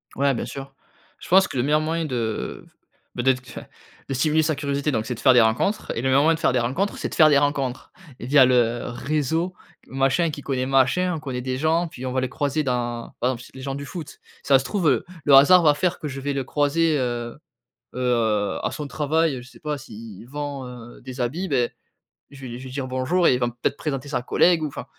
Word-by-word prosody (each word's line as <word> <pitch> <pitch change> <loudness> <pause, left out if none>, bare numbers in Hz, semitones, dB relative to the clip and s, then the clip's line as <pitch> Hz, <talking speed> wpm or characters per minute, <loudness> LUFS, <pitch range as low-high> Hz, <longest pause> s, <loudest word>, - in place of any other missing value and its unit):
Ouais, 140 0 +2
bien 120 - -3
sûr. 135 0 -8 0.5
Je - - -11
pense 190 +2 +6
que - - -6
le 120 - +1
meilleur 150 +3 +3
moyen 165 +1 -1
de 120 -6 -3 0.5
bah 120 - -2
d'être 130 -1 +2
enfin, - - -9 0.5
de - - -1
stimuler 155 +4 +2
sa 155 0 0
curiosité 140 +1 -1
donc, 110 -5 -1
c'est 125 - -3
de 115 - -9
faire 130 0 +5
des 125 - +6
rencontres 110 - 0
et 115 - -2
le 135 - 0
meilleur 140 +2 +4
moyen 165 - +4
de - - -9
faire - - +2
des 125 - +1
rencontres, 140 +13 -1
c'est - - -3
de - - -7
faire 155 -2 +7
des 145 - +5
rencontres 140 -3 -1 0.3
via 135 +3 +5
le 120 -2 +2
réseau, 155 +7 -1 0.3
machin 135 +5 +1
qui 145 - -7
connaît 130 -2 -2
machin. 135 +8 +2
On - - -5
connaît 130 -4 -5
des 130 0 -3
gens 160 +4 +1
puis, 130 -4 -9
on 130 - -2
va 130 0 0
les 130 - -2
croiser 145 +3 -1
dans 120 -3 -2
par 125 - +1
exemple, 125 -1 -7
ç - - -14
les 130 - -9
gens 135 0 -4
du 140 0 -6
foot, 155 -1 -8 0.2
ça 135 - +5
se - - -5
trouve, 185 -3 0
heu, 130 -4 +1 0.2
le 145 - +4
hasard 175 +7 +8
va 150 -2 +6
faire 175 +4 -1
que 150 - -5
je 135 -1 -6
vais 140 +1 -2
le 135 -1 -2
croiser, 150 +3 +1
heu, 120 0 -3 0.6
heu, 115 -5 0
à - - -1
son 150 - -5
travail, 150 -1 0
je 125 - -14
sais - - -17
pas, 150 -2 -3
s'il 110 -4 -11
vend, 145 -1 -5
heu, 120 -1 -11
des 130 +1 -8
habits, 160 +10 -2
beh, 125 -4 +1 0.6
je 140 -1 -13
vais 130 - -7
lui 120 +1 -7
je - - -10
vais 130 - -8
lui 130 - -10
dire: 135 -2 -3
«Bonjour» 130 +8 +1
et - - +5
il 125 - 0
va 120 - +1
m - - -4
peut-être 140 - 0
présenter 140 -2 -4
sa 130 - -1
collègue 170 +5 +3
ou - - 0
enfin, 140 - -7
135 Hz, 250 wpm, -23 LUFS, 125-150 Hz, 0.6 s, hasard